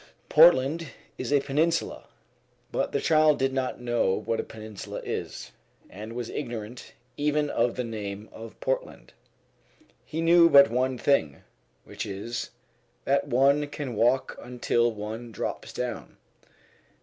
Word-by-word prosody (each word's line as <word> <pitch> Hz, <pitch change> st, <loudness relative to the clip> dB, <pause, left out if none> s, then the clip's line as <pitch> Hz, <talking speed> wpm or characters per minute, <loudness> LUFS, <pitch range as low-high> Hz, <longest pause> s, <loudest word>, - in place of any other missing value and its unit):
Portland 160 Hz, 0 st, +5 dB, 0.3 s
is 130 Hz, -, -4 dB
a 145 Hz, -, +5 dB
peninsula; 160 Hz, +5 st, 0 dB, 0.7 s
but -, -, -1 dB
the -, -, 0 dB
child 155 Hz, -2 st, +4 dB
did 135 Hz, 0 st, 0 dB
not 130 Hz, -1 st, -2 dB
know 120 Hz, -5 st, +1 dB
what 115 Hz, 0 st, -1 dB
a -, -, -1 dB
peninsula 110 Hz, -2 st, -8 dB
is, -, -, -5 dB, 0.4 s
and 105 Hz, +4 st, -8 dB
was 120 Hz, -1 st, -4 dB
ignorant 120 Hz, +1 st, -6 dB, 0.2 s
even 150 Hz, 0 st, 0 dB
of 120 Hz, +1 st, +1 dB
the 125 Hz, -, -2 dB
name 105 Hz, -2 st, -6 dB
of 115 Hz, 0 st, -11 dB
Portland. -, -, -3 dB, 0.9 s
He 160 Hz, -, -6 dB
knew 170 Hz, 0 st, +6 dB
but 140 Hz, -4 st, +7 dB
one 130 Hz, +1 st, 0 dB
thing, 80 Hz, -, +1 dB, 0.4 s
which -, -, -6 dB
is, 100 Hz, +4 st, -5 dB, 0.6 s
that -, -, +1 dB
one 140 Hz, +4 st, +3 dB
can 145 Hz, -3 st, -5 dB
walk 120 Hz, +4 st, +1 dB
until 120 Hz, -1 st, 0 dB
one 110 Hz, +2 st, -7 dB
drops 105 Hz, -, -5 dB
down. -, -, -5 dB
125 Hz, 135 wpm, -27 LUFS, 115-145 Hz, 0.9 s, but